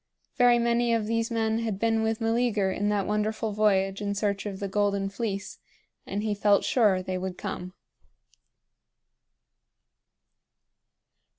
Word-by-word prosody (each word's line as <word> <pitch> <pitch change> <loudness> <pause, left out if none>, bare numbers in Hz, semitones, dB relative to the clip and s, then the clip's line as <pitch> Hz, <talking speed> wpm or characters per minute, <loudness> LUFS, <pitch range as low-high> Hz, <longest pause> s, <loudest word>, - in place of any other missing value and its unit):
Very 245 -2 +5
many 235 0 +2
of 220 -2 -1
these 230 +1 -1
men 225 -1 0
had 220 -4 -2
been 225 +1 +1
with 220 0 0
Meleager 225 -4 +1
in 205 +2 -1
that 205 -2 0
wonderful 215 +1 -1
voyage 195 -2 +1
in 200 0 -2
search 200 0 -1
of 195 -2 -6
the 200 - -3
Golden 200 0 0
Fleece, 195 -1 -4 0.5
and 205 +2 -3
he 215 -1 0
felt 205 0 +3
sure 205 -7 +2
they 185 0 -3
would 185 -1 -5
come. 180 +1 -6
210 Hz, 135 wpm, -27 LUFS, 195-225 Hz, 0.5 s, Very